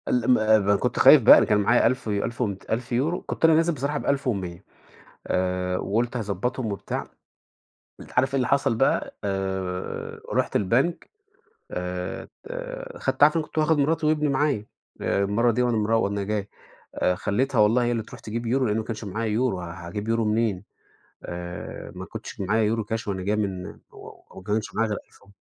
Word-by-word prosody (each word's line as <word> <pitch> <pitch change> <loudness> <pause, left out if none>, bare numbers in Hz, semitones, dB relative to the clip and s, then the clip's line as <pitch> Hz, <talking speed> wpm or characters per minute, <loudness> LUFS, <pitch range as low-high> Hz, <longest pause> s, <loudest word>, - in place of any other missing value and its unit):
ال 125 0 +2
م - - +8 0.3
ما 100 +1 +4
كنت - - -1
خايف - - +9
بقى، - - +9
أنا - - +4
كان 105 - +3
معايا 115 +4 +4
ألف 125 -2 -1
ألف 105 +4 -2
ومت 100 -5 -3
1000€، 125 +9 -1
كنت - - 0
أنا 165 - +6
نازل 165 +1 +3
بصراحة 145 +1 -2
ب1100 100 -12 -2 0.6
آآ، 90 0 0
وقُلت 115 +6 -1
هضبّطهم 110 +3 -2
وبتاع، 100 - -4 0.9
أنت - - -12
عارف 135 +2 +3
إيه - - +2
اللي 130 -2 +1
حصل 140 -4 +2
بقى؟ 135 +4 +1
آآ 95 -2 -3
رُحت - - 0
البنك 125 - +1 0.6
آآ 90 +1 -4
ت - - -16 0.7
اخدت 135 +1 -2
عارف 150 +2 +7
أنا 160 - +1
كنت 155 - -6
واخد 155 0 +3
مراتي 155 +2 +1
وابني 150 -1 +2
معايا، 135 -6 0 0.3
آآ 100 - +1
المرة 110 +5 +2
دي 120 +2 +1
وأنا 120 -2 +1
مرو 110 +1 +2
وأنا 100 0 -1
جاي، 105 0 -2 0.5
آآ 90 - +1
خليتها 120 +8 -1
والله 115 +4 +4
هي 120 - +1
اللي 115 -2 -1
تروح - - -12
تجيب 115 +2 -5
يورو 130 +3 +1
لأنه 105 0 0
ما 110 - -2
كانش 110 -1 -5
معايا 110 +3 -3
يورو، 110 -3 0
هاجيب 85 +5 -6
يورو 115 0 +1
منين؟ 105 -3 0 0.6
آآ، 85 0 -7
ما - - -6
كنتش - - -9
معايا 105 +3 +1
يورو 110 0 0
cash 115 -1 -3
وأنا 95 -2 -2
جاي 105 +3 +1
من 95 -4 -2 0.2
و - - -11 0.2
وما 95 - -11
كانش 105 +1 -2
معايا 115 -1 +1
غير 105 - -1
ألف - - -23
و - - -22
110 Hz, 190 wpm, -25 LUFS, 100-125 Hz, 0.9 s, خايف